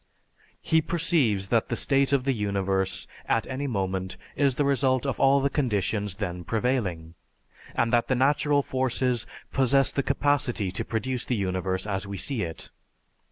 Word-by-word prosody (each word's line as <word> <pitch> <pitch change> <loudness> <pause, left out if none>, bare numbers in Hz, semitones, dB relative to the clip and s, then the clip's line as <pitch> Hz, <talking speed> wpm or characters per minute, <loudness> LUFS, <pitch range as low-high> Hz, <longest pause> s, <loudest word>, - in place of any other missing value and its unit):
He 160 0 +3
perceives 150 - +1
that 115 -2 +1
the 120 - 0
state 135 +2 +2
of 140 -2 +2
the 135 0 +1
universe 100 -3 -1 0.2
at 115 - +1
any 135 +2 -3
moment 95 -5 -2 0.2
is 140 -3 +2
the 145 - +1
result 135 -1 +2
of 135 - -2
all 135 0 +5
the 140 - +1
conditions 105 - 0
then 90 -4 -4
prevailing, 105 -8 -1 0.6
and 115 +1 +1
that 120 0 +3
the 130 - +1
natural 145 +2 +2
forces 130 -2 0 0.3
possess 135 +1 +3
the 140 - 0
capacity 135 -9 0
to 95 - -2
produce 120 +2 -2
the 125 - -1
universe 95 -1 -1
as 100 -1 -3
we 100 0 -5
see 130 +3 -1
it. 80 -3 -5
120 Hz, 160 wpm, -26 LUFS, 100-135 Hz, 0.6 s, all